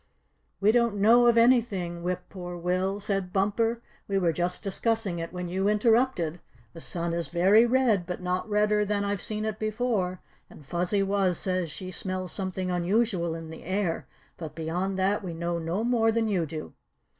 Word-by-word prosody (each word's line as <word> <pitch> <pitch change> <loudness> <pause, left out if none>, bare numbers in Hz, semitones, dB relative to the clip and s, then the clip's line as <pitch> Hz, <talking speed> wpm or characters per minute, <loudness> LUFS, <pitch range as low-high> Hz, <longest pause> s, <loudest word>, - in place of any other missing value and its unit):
"We 205 +2 +4
don't 235 -2 +2
know 230 +4 +5
of 235 -1 +4
anything, 215 -8 +3
Whip 180 +1 -2
Poor 180 -2 -7
Will," 185 +3 -1
said 195 -2 -2
Bumper. 225 +4 0 0.2
"We 195 - 0
were 175 -4 +2
just 175 +4 -2
discussing 205 -2 -1
it 165 0 -5
when 180 0 -5
you 190 +3 0
interrupted. 210 -6 +2 0.3
The 165 - -10
sun 170 0 -3
is 170 0 -1
very 195 +7 +5
red, 235 -8 +2
but 180 - -4
not 180 +3 -2
redder 210 0 +2
than 205 0 -1
I've 200 -1 -2
seen 215 0 -3
it 215 -1 -3
before, 215 -5 -1 0.3
and 150 - -15
Fuzzy 180 +6 0
Wuzz 195 -2 +1
says 185 -3 -1
she 185 +5 -7
smells 185 -1 -3
something 185 -1 -3
unusual 180 -1 +1
in 165 -1 -8
the 160 - -9
air; 185 -2 -2 0.3
but 160 -3 -7
beyond 180 +4 -2
that 195 +2 +1
we 175 -3 -5
know 170 +1 -2
no 170 +6 -2
more 230 -2 +3
than 225 0 +1
you 180 -6 0
do." 155 +1 -7
190 Hz, 180 wpm, -27 LUFS, 175-215 Hz, 0.3 s, know